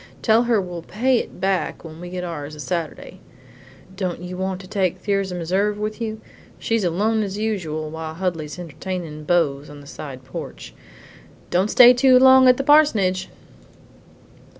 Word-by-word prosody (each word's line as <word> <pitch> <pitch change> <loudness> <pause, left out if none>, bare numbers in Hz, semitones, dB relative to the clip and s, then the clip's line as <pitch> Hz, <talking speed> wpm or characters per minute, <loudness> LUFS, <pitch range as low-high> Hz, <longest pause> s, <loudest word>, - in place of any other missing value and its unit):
Tell 230 +1 +4
her 235 -3 +2
we'll 180 -3 -5
pay 240 +9 +1
it - - -8
back 190 -1 -1
when 160 -1 -10
we 175 - -7
get 180 0 -5
ours 155 -4 -6
a - - -13
Saturday. 165 0 -5 0.8
Don't 185 -3 -3
you 180 +1 -7
want 190 0 -3
to 185 - -12
take 190 -3 -1
Thirza 195 -1 -2
Meserve 190 +5 0
with 215 +2 -4
you? 220 -1 -3 0.4
She's 225 -2 -1
alone 210 +6 +1
as 200 -1 -3
usual 175 -8 -3
while 160 0 -6
Huldy's 165 -4 -3
entertainin' 165 -2 -6
beaux 150 -5 +1
on 145 0 -11
the 145 - -14
side 135 -2 -9
porch. - - -8 0.8
Don't 185 +4 +2
stay 245 +2 +8
too 255 +1 +5
long 260 0 +7
at 250 -1 +6
the 275 - -1
parsonage!" 235 -11 +3
185 Hz, 165 wpm, -22 LUFS, 165-215 Hz, 0.8 s, stay